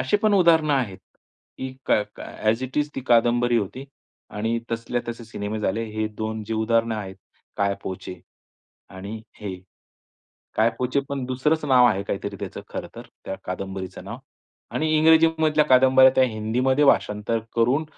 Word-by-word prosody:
असे 130 Hz, +11 st, +2 dB
पण 215 Hz, -1 st, +4 dB
उदाहरणं 165 Hz, -5 st, +4 dB
आहेत 110 Hz, -8 st, -1 dB, 0.6 s
की 130 Hz, 0 st, -5 dB
काय 105 Hz, -, +3 dB
काय -, -, -9 dB
ॲज 115 Hz, +4 st, -2 dB
इट 130 Hz, +3 st, -4 dB
इज 150 Hz, 0 st, 0 dB
ती -, -, -3 dB
कादंबरी 120 Hz, 0 st, +3 dB
होती 125 Hz, +6 st, -5 dB, 0.5 s
आणि 115 Hz, +2 st, -1 dB
तसल्या 115 Hz, +1 st, -2 dB
तसे 115 Hz, 0 st, -6 dB
सिनेमे 110 Hz, -1 st, -5 dB
झाले. 110 Hz, +3 st, -1 dB
हे 110 Hz, 0 st, -3 dB
2 110 Hz, 0 st, -5 dB
जे 110 Hz, -, -3 dB
उदाहरणं 115 Hz, +1 st, +1 dB
आहेत 95 Hz, -2 st, -6 dB, 0.4 s
काय 100 Hz, 0 st, +1 dB
पोचे 90 Hz, -1 st, -7 dB, 0.7 s
आणि 100 Hz, +4 st, -7 dB, 0.2 s
हे, 100 Hz, -3 st, -4 dB, 1.0 s
काय 110 Hz, +2 st, +3 dB
पोचे 130 Hz, +2 st, 0 dB
पण 140 Hz, -2 st, -3 dB
दुसरंच 150 Hz, +5 st, 0 dB
नाव 130 Hz, -3 st, +5 dB
आहे 100 Hz, -4 st, +1 dB
काहीतरी 100 Hz, 0 st, -4 dB
त्याचं -, -, -6 dB
खरंतर -, -, -8 dB, 0.2 s
त्या 95 Hz, -, -4 dB
कादंबरीचं 95 Hz, 0 st, -6 dB
नाव -, -, -7 dB, 0.6 s
आणि 160 Hz, -, 0 dB
इंग्रजीमधल्या 160 Hz, -1 st, +4 dB
कादंबऱ्या 130 Hz, 0 st, +6 dB
त्या 130 Hz, -, +6 dB
हिंदीमध्ये 125 Hz, +5 st, +1 dB
भाषांतर 105 Hz, -3 st, +2 dB, 0.2 s
करून, 125 Hz, +7 st, +2 dB
115 Hz, 155 wpm, -24 LUFS, 105-130 Hz, 1.0 s, कादंबऱ्या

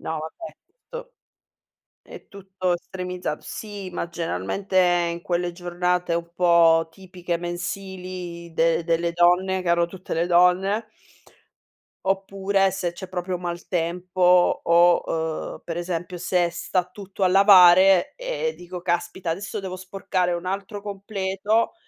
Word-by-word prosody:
No 160 Hz, -, -4 dB
vabbè, 160 Hz, -, -8 dB, 0.3 s
to -, -, -8 dB, 0.9 s
è -, -, -13 dB
tutto 190 Hz, -2 st, -3 dB
estremizzato. 180 Hz, -2 st, -5 dB
Sì, 205 Hz, -3 st, -7 dB
ma 170 Hz, -, -3 dB
generalmente 170 Hz, -, -3 dB, 0.3 s
in 170 Hz, 0 st, -6 dB
quelle 175 Hz, 0 st, -1 dB
giornate 175 Hz, 0 st, -1 dB
un 170 Hz, 0 st, -3 dB
po' 170 Hz, -2 st, +4 dB
tipiche 180 Hz, -1 st, -5 dB
mensili 180 Hz, -1 st, -6 dB
de 165 Hz, 0 st, +2 dB
delle 170 Hz, 0 st, 0 dB
donne, 180 Hz, +2 st, +3 dB
che 180 Hz, -, -3 dB
hanno 170 Hz, 0 st, +3 dB
tutte 185 Hz, +1 st, -7 dB
le 170 Hz, +2 st, 0 dB
donne. 180 Hz, +5 st, +3 dB, 1.2 s
Oppure 195 Hz, 0 st, +1 dB
se 180 Hz, -2 st, -2 dB
c'è 185 Hz, +2 st, -8 dB
proprio 180 Hz, 0 st, -4 dB
maltempo 180 Hz, +1 st, +1 dB
o, 170 Hz, +1 st, +5 dB, 0.5 s
uhm, -, -, -12 dB
per 165 Hz, -, -5 dB
esempio 175 Hz, 0 st, -4 dB
se 180 Hz, -1 st, +1 dB
sta 175 Hz, +1 st, -1 dB
tutto 195 Hz, 0 st, -9 dB
a 185 Hz, -, +5 dB
lavare, 185 Hz, -1 st, +6 dB
ehm, -, -, -3 dB
dico: 175 Hz, 0 st, -9 dB
"Caspita 175 Hz, 0 st, -2 dB
adesso 195 Hz, +6 st, -4 dB
devo 185 Hz, -1 st, -6 dB
sporcare 185 Hz, -1 st, -2 dB
un 175 Hz, 0 st, -4 dB
altro 200 Hz, +2 st, -4 dB
completo." 200 Hz, -, -1 dB
180 Hz, 130 wpm, -23 LUFS, 175-190 Hz, 1.2 s, lavare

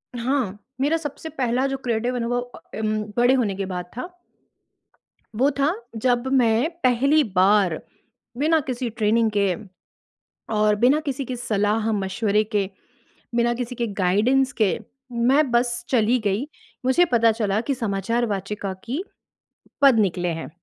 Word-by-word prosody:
हाँ। 240 Hz, -4 st, -1 dB, 0.2 s
मेरा 300 Hz, +4 st, +2 dB
सबसे 315 Hz, 0 st, -6 dB
पहला 260 Hz, -3 st, 0 dB
जो 270 Hz, -, -2 dB
क्रिएटिव 240 Hz, +1 st, -1 dB
अनुभव 245 Hz, 0 st, -1 dB
अ, 245 Hz, 0 st, -11 dB, 0.2 s
उम, 215 Hz, 0 st, 0 dB, 0.2 s
बड़े 245 Hz, +2 st, +5 dB
होने 225 Hz, -7 st, +1 dB
के 195 Hz, -, -3 dB
बाद 180 Hz, -1 st, -4 dB
था। 255 Hz, -, -4 dB, 1.3 s
वो 265 Hz, +6 st, +3 dB
था 290 Hz, +5 st, +3 dB, 0.3 s
जब 245 Hz, 0 st, +2 dB
मैं 240 Hz, +2 st, +3 dB
पहली 275 Hz, +5 st, +4 dB
बार 190 Hz, -2 st, +4 dB, 0.6 s
बिना 315 Hz, +3 st, +3 dB
किसी 250 Hz, -1 st, -2 dB
ट्रेनिंग 225 Hz, 0 st, +1 dB
के 195 Hz, -3 st, +2 dB, 1.0 s
और 210 Hz, 0 st, +3 dB
बिना 270 Hz, +5 st, +5 dB
किसी 275 Hz, 0 st, -2 dB
के 250 Hz, 0 st, -5 dB
सलाह-मशविरे 210 Hz, -1 st, 0 dB
के, 205 Hz, -3 st, -1 dB, 0.7 s
बिना 240 Hz, 0 st, +2 dB
किसी 245 Hz, +1 st, -4 dB
के 235 Hz, -1 st, -1 dB
गाइडेंस 245 Hz, +9 st, +3 dB
के 200 Hz, -, +3 dB, 0.3 s
मैं 255 Hz, +4 st, +3 dB
बस 240 Hz, 0 st, +1 dB
चली 240 Hz, 0 st, +3 dB
गई। 205 Hz, +8 st, 0 dB, 0.4 s
मुझे 260 Hz, +8 st, +4 dB
पता 230 Hz, -1 st, +5 dB
चला 215 Hz, -2 st, 0 dB
कि 280 Hz, -, +2 dB
समाचार 230 Hz, +1 st, -1 dB
वाचिका 200 Hz, -1 st, -3 dB
की 270 Hz, +10 st, -3 dB, 0.8 s
पद 265 Hz, -5 st, +6 dB
निकले 180 Hz, -3 st, +1 dB
हैं -, -, -7 dB
235 Hz, 145 wpm, -23 LUFS, 210-255 Hz, 1.3 s, पद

